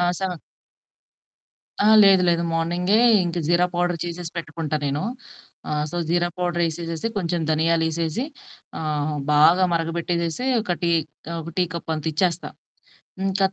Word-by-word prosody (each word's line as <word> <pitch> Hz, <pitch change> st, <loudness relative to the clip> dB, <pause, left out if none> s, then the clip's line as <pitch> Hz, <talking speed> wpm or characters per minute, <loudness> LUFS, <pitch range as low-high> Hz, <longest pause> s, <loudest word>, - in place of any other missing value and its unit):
ఆ! -, -, +3 dB, 0.2 s
7 180 Hz, -4 st, -3 dB, 1.4 s
ఆ! -, -, +3 dB, 0.2 s
లేదు 190 Hz, -2 st, +6 dB
లేదు. 170 Hz, 0 st, +1 dB
మార్నింగే 175 Hz, +5 st, +1 dB, 0.3 s
ఇంకా 175 Hz, 0 st, -2 dB
జీరా 175 Hz, +1 st, +4 dB
పౌడరు 175 Hz, -1 st, 0 dB
చేసేసి 170 Hz, 0 st, -6 dB
పెట్టుకుంటా 155 Hz, -1 st, -4 dB
నేను. 140 Hz, +1 st, -1 dB, 0.7 s
ఆహ్, 150 Hz, 0 st, 0 dB
సో 175 Hz, -, -3 dB
జీరా 175 Hz, 0 st, +2 dB
పౌడర్ 175 Hz, -1 st, -1 dB
యేసేసేసి 165 Hz, +3 st, -3 dB
కొంచెం 175 Hz, -2 st, -1 dB
ధనియాలేసేసి 160 Hz, +4 st, +1 dB, 0.6 s
ఆహ్, 150 Hz, -1 st, -2 dB, 0.2 s
బాగా 165 Hz, +5 st, +6 dB
మరగబెట్టేసేసి 170 Hz, +4 st, -1 dB, 0.2 s
ఒక 185 Hz, -4 st, -1 dB
టీ, 170 Hz, -1 st, +1 dB, 0.4 s
ఆహ్, 170 Hz, -, -3 dB
ఒక 165 Hz, -, -8 dB
టీ 180 Hz, -, +4 dB
కప్పంతిచ్చేస్తా. 160 Hz, +2 st, -1 dB, 0.8 s
ఇంకది 195 Hz, 0 st, +1 dB
170 Hz, 130 wpm, -23 LUFS, 160-175 Hz, 1.4 s, లేదు